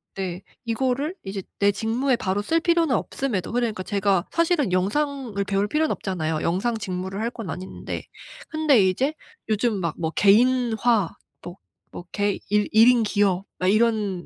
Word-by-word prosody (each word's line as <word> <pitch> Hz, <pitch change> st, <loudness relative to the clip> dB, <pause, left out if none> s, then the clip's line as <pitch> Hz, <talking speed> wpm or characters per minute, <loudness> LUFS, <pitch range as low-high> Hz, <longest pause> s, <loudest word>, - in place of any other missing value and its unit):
네 185 Hz, -1 st, -4 dB, 0.2 s
이거를 260 Hz, +7 st, -1 dB
이제 195 Hz, 0 st, -4 dB, 0.2 s
내 200 Hz, 0 st, +4 dB
직무에 240 Hz, +5 st, 0 dB
바로 195 Hz, -1 st, -1 dB
쓸 330 Hz, +10 st, +1 dB
필요는 335 Hz, -6 st, +2 dB
없음에도 220 Hz, -9 st, -2 dB
그러니까 230 Hz, -5 st, -1 dB
제가 195 Hz, -3 st, +1 dB
사실은 335 Hz, -, +1 dB
영상을 225 Hz, +2 st, -1 dB
배울 200 Hz, +1 st, 0 dB
필요는 310 Hz, +6 st, +1 dB
없잖아요 160 Hz, -5 st, -2 dB
영상 220 Hz, +7 st, 0 dB
직무를 190 Hz, -1 st, -4 dB
할 230 Hz, -, 0 dB
건 225 Hz, -6 st, -7 dB
아닌데. 185 Hz, +1 st, -6 dB, 0.4 s
근데 310 Hz, -6 st, +3 dB
이제 265 Hz, +11 st, 0 dB, 0.4 s
요즘 215 Hz, -2 st, +1 dB
막 170 Hz, -3 st, -2 dB
뭐 160 Hz, -1 st, -2 dB
개인화 230 Hz, -1 st, +3 dB, 0.3 s
뭐, 175 Hz, +2 st, -9 dB, 0.3 s
뭐 175 Hz, -, -9 dB
개 205 Hz, -1 st, 0 dB
일 210 Hz, 0 st, +2 dB
1 225 Hz, +2 st, +7 dB
인 245 Hz, -2 st, +5 dB
기업 200 Hz, -2 st, +1 dB
막 185 Hz, -, -1 dB
이런 210 Hz, -4 st, +1 dB
210 Hz, 305 characters per minute, -24 LUFS, 190-250 Hz, 0.4 s, 1